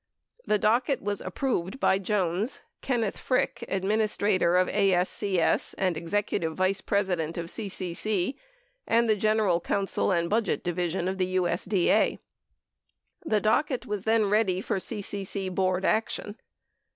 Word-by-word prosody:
The 210 - +3
docket 240 +6 +2
was 205 0 -2
approved 190 +1 -2
by 190 - +3
Jones, 195 +2 -1 0.2
Kenneth 235 -6 -1
Frick, 255 - 0
Administrator 200 -2 +1
of 185 - +3
ASCS 190 -1 +1
and 185 -3 +1
Executive 170 -1 -1
Vice 190 +1 +1
President 180 -6 -1
of 170 - -3
CCC, 195 +1 -2 0.5
and 230 +1 +3
the 215 - +4
General 215 -4 +2
Counsel 195 +2 0
and 170 -2 +1
Budget 215 0 0
Division 175 0 -1
of 190 +1 -2
USD 185 0 0
A. - - +3 1.1
The 215 -8 +1
docket 250 +5 +1
was 205 -1 -4
then 220 -1 +3
ready 200 -3 +2
for 195 - -2
CCC 195 -2 -3
Board 185 0 0
action. 215 -1 0
195 Hz, 125 wpm, -27 LUFS, 185-215 Hz, 1.1 s, the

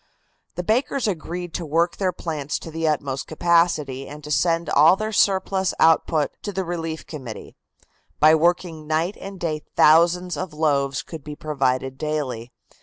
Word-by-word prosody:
The 180 - -3
bakers 245 +5 0
agreed 175 -2 -4
to 175 - -3
work 165 +3 0
their 190 -2 0
plants 155 -5 -4
to 165 - -9
their 160 0 0
utmost 140 -2 -3
capacity 160 -5 +1
and 150 +1 -10
to 150 - -7
send 165 +1 +1
all 155 +6 +6
their 215 +2 -3
surplus 190 -1 +1
output 160 -2 +3
to 205 - -4
the 190 0 -2
relief 165 -2 -4
committee. 130 -8 -9 0.6
By 155 +1 +7
working 165 -1 +1
night 160 +5 0
and 195 -1 -8
day 155 -3 -2
thousands 170 +2 +4
of 160 -1 -5
loaves 140 -3 0
could 160 -4 -9
be 150 +1 -7
provided 135 -3 -1
daily. 135 -7 -3
160 Hz, 160 wpm, -23 LUFS, 150-175 Hz, 0.6 s, By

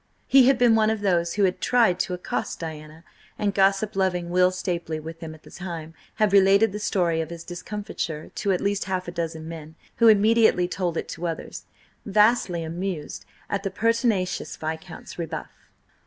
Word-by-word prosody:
He 265 -2 +6
had 270 -1 +5
been 245 -2 +5
one 220 -1 +4
of 220 -1 -1
those 170 -4 +1
who 205 - +2
had 185 -1 +1
tried 230 -8 +3
to 180 - -1
accost 180 - -4
Diana, 155 0 -8 0.3
and 205 -2 0
gossip 195 +2 +2
loving 180 -3 0
Will 180 0 +4
Stapely, 175 -3 -3
with 165 +1 -8
him 160 -2 -7
at 155 - -19
the - - -15
time, 165 -4 -7 0.2
had 210 -2 +2
related 200 +2 +5
the 210 - -5
story 175 -5 +1
of 160 - -5
his 170 -1 -8
discomfiture 175 -4 -5
to 200 - -1
at 180 - 0
least 200 0 0
half 185 -2 -2
a - - -4
dozen 165 -2 -4
men, 160 -1 -9 0.2
who 230 - +5
immediately 220 -3 +5
told 175 -2 -2
it - - -3
to 175 +1 -4
others, 165 - -6 0.4
vastly 210 -4 +2
amused 160 - -5 0.2
at 200 - -2
the 195 - -2
pertinacious 220 -2 0
Viscount's 160 +2 -7
rebuff. 165 -2 -7
185 Hz, 185 wpm, -25 LUFS, 165-205 Hz, 0.4 s, He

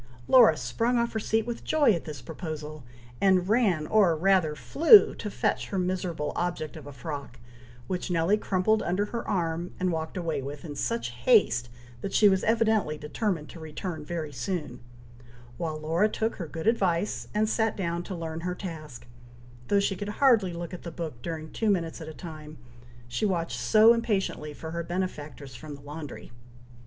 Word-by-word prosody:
Laura 235 -12 +7
sprung 230 - 0
off 235 0 0
her 220 - -1
seat 220 +1 0
with 240 -1 -5
joy 295 -6 +4
at 170 - -3
this 145 -6 -7
proposal, 155 0 -6 0.4
and 185 -2 +4
ran 200 -8 +2
or 190 -2 +4
rather 175 -2 +2
flew 330 - +7
to 210 - -5
fetch - - -1
her 195 - -3
miserable 180 -4 -1
object 175 -2 -2
of 150 -3 -10
a - - -7
frock, 140 -2 -7 0.5
which 185 -1 -3
Nelly 170 +3 +3
crumpled 215 +1 +1
under 185 +4 0
her 230 +2 -4
arm, 170 -3 -2
and 185 0 +1
walked 160 +2 -3
away 165 -5 -2
with, 140 +3 -7
in 145 -3 -6
such 230 - -2
haste 120 0 +3 0.3
that 195 - -4
she 210 - +7
was 190 -1 +3
evidently 220 -8 +2
determined 150 +2 -2
to 170 - -10
return 160 +1 -5
very 155 -1 -4
soon; 140 -1 -4 0.8
while 155 0 -3
Laura 165 +7 +2
took 220 +1 -2
her 170 - -5
good 160 +1 -6
advice, 200 -4 +1
and 215 +1 +2
sat 220 0 0
down 170 -3 -1
to 185 +2 -6
learn 165 -1 -5
her 180 +1 -3
task, 155 -9 -8 0.6
though 200 - +3
she 200 0 0
could 205 +2 -5
hardly 220 -5 +3
look 170 +1 -6
at 180 - -7
the 170 - -6
book 155 -7 -6
during 160 0 -5
two 220 - 0
minutes 170 -4 0
at 160 - -7
a - - -6
time 155 -3 -9 0.5
she 120 - -3
watched 170 - 0
so 215 - +6
impatiently 205 -9 -1
for 160 +2 -8
her 170 0 -2
benefactress 155 -6 -5
from 145 +3 -8
the 140 - -14
laundry. 145 -2 -8
170 Hz, 185 wpm, -27 LUFS, 155-205 Hz, 0.8 s, Laura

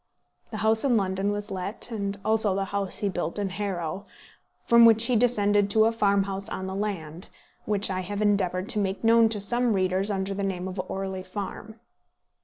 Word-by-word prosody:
The 215 - -6
house 220 0 +3
in 255 -4 +3
London 195 0 0
was 205 0 -5
let; 195 +5 -5
and 200 -2 -3
also 215 -3 +2
the 195 0 -1
house 200 -2 -2
he 205 - -1
built 185 -2 -3
at 200 -2 -2
Harrow, 190 -1 -4 0.6
from 235 0 +6
which 225 0 +6
he 245 - +1
descended 205 -4 +2
to 220 +1 +4
a 225 - +3
farmhouse 200 -2 0
on 190 - -5
the 190 - -5
land, 185 -5 -5 0.4
which 205 -1 0
I 185 - -2
have 200 +2 -4
endeavoured 195 -3 +1
to 215 - +1
make 195 +1 -2
known 225 0 +5
to 215 -2 -1
some 240 +3 +1
readers 190 +1 0
under 195 -1 -2
the 200 - -4
name 190 -2 -3
of 185 0 -4
Orley 190 -1 -4
Farm. 210 +3 -7
200 Hz, 195 wpm, -26 LUFS, 190-215 Hz, 0.6 s, from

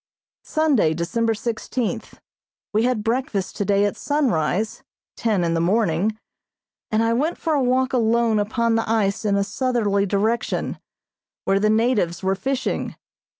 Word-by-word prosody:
Sunday, 285 - +2
December 225 +7 0
sixteenth: 235 +1 -3 0.5
We 220 +3 +2
had 245 -4 0
breakfast 225 -4 -1
today 200 0 +2
at 205 - -1
sunrise 220 - 0 0.3
(ten 210 -6 0
in 165 -1 +1
the 165 - +1
morning) 200 +2 +1 0.7
and 220 +1 +2
I 230 0 +2
went 300 +8 0
for 320 - -1
a 290 - +2
walk 255 +1 +1
alone 230 -2 +2
upon 230 +3 0
the 225 -1 0
ice 215 -2 +1
in 200 -1 +2
a 200 - +2
southerly 210 -3 0
direction, 220 +4 -1 0.7
where 195 0 +2
the 215 +1 +2
natives 215 -6 +1
were 190 0 +2
fishing. 265 +7 -2
220 Hz, 145 wpm, -22 LUFS, 200-240 Hz, 0.7 s, Sunday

